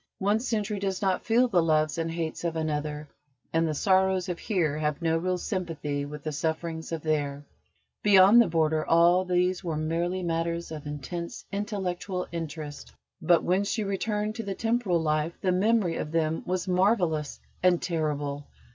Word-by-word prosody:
One 205 +3 +2
century 215 -4 -2
does 195 0 -2
not 190 -1 +1
feel 240 +2 +3
the 185 -7 +3
loves 155 -1 +1
and 165 0 -1
hates 165 -1 -4
of 170 -1 -1
another, 150 -1 -2 0.5
and 165 0 +2
the 155 - -2
sorrows 190 +1 +2
of 175 - -3
Here 160 -8 0
have 150 -1 -1
no 165 -1 +1
real 180 +2 0
sympathy 160 -7 -3
with 145 0 -8
the 155 - -3
sufferings 160 +2 -3
of 165 -2 -4
There. 145 -2 -1 0.6
Beyond 205 +3 +7
the 235 - +3
Border 160 -1 +1
all 170 +2 +4
these 180 +1 +1
were 165 -3 -2
merely 170 +4 -1
matters 170 0 -2
of 150 -2 -7
intense 170 +4 -6
intellectual 195 -3 -3
interest. 155 -3 -6 0.3
But 175 -2 +4
when 185 +3 +2
she 210 +2 -1
returned 210 +2 -1
to 225 - -3
the 200 -2 -4
temporal 225 -6 +1
life 155 +1 0
the 185 - +1
memory 195 -2 +2
of 150 - -4
them 160 -1 0
was 185 +1 -1
marvellous 180 -5 +1 0.2
and 180 -1 +4
terrible. 145 -4 -2
170 Hz, 170 wpm, -27 LUFS, 155-190 Hz, 0.6 s, Beyond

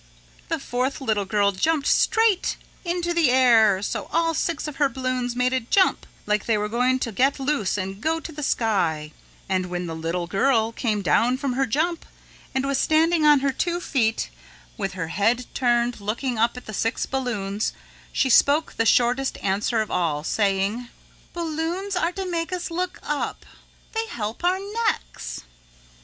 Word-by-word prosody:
'" - - -28
The 330 - 0
fourth 260 0 -2
little 220 -7 0
girl 200 0 +2
jumped 285 +9 0
straight 445 -4 +3 0.3
into 345 -1 -1
the 335 -6 +3
air 225 -6 +5
so - - -3
all 330 0 +2
six 325 -1 -1
of 300 - -7
her 285 -2 +3
balloons 255 -2 -2
made 250 +1 +1
a 260 - +2
jump 370 - +2 0.2
like 210 -1 0
they 225 -2 +3
were 210 0 -1
going 250 +4 +2
to 240 -3 -3
get 270 +7 +1
loose 270 -8 0
and 195 +1 -4
go 325 +1 0
to 325 - -8
the 300 -1 -7
sky 170 - 0 0.4
and 185 -1 0
when 180 0 -3
the 165 -1 -5
little 165 +2 -2
girl 225 +5 +2
came 220 -3 -1
down 235 - +3
from 270 -2 -2
her 270 +1 +1
jump 320 +8 0 0.5
and 265 +1 +1
was 275 -1 0
standing 320 0 +3
on 295 -2 +6
her 275 0 +1
two 345 +6 -1
feet 225 - 0 0.4
with 195 - -3
her 165 -4 -4
head 230 +7 +1
turned 240 -2 +1
looking 230 +4 -2
up 235 +2 +2
at 250 - -9
the 215 - -8
six 225 +4 -1
balloons, 215 -6 -2 0.4
she 270 - +1
spoke 285 +5 +3
the 225 - +2
shortest 250 +4 +2
answer 205 +4 +1
of 215 - -4
all, 155 -4 0
saying: 205 +5 0 0.4
"Balloons 340 +4 -3
are 355 -1 +1
to 385 0 -4
make 340 -1 -2
us 360 -1 -3
look 360 +2 -2
up. 295 -1 -3 0.5
They 450 0 -1
help 220 - -5
our 360 +1 +3 0.3
necks." - - -3
250 Hz, 175 wpm, -24 LUFS, 210-310 Hz, 0.5 s, on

